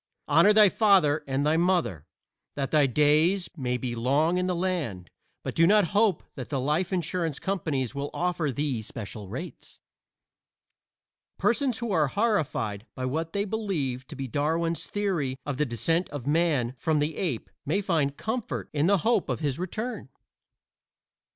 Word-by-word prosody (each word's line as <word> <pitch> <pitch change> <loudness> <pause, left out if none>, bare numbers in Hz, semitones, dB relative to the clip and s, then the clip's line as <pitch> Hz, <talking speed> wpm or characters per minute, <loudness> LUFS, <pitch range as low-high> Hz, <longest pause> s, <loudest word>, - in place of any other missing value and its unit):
Honor 210 - +6
thy 210 0 +7
father 185 -8 +3
and 135 +1 0
thy 155 +2 +3
mother 170 - +1 0.5
that 135 -2 -2
thy 150 -3 +4
days 155 - +3
may 125 -5 -1
be 125 0 -3
long 145 +9 +2
in 180 - 0
the 180 - 0
land, 165 - -2 0.3
but - - -4
do 165 +1 +4
not 205 -3 +4
hope 205 -4 +3
that 130 -4 -7
the 140 - -1
life 150 +8 0
insurance 170 -4 -1
companies 155 - -2
will 140 0 -3
offer 175 -4 -1
thee 135 -3 -2
special 105 -1 -7
rates. 165 - -8 1.6
Persons 245 0 +1
who 235 -3 -3
are 155 -6 +3
horrified 135 - -1
by 130 - -3
what 160 +5 -2
they 200 0 0
believe 170 - -2
to 155 - -9
be 135 -1 -4
Darwin's 160 +6 -1
theory 175 -11 -1
of 145 -3 -3
the 150 0 +1
descent 165 - 0
of 145 -4 -6
Man 145 -5 +2
from 150 +5 -1
the 150 +2 0
Ape 155 - -3
may 160 +8 0
find 160 -8 0
comfort 230 +2 -4
in 150 +2 +2
the 200 +1 +4
hope 230 -5 +2
of - - -1
his 145 -1 -1
return. 215 - -4
155 Hz, 165 wpm, -27 LUFS, 135-185 Hz, 1.6 s, thy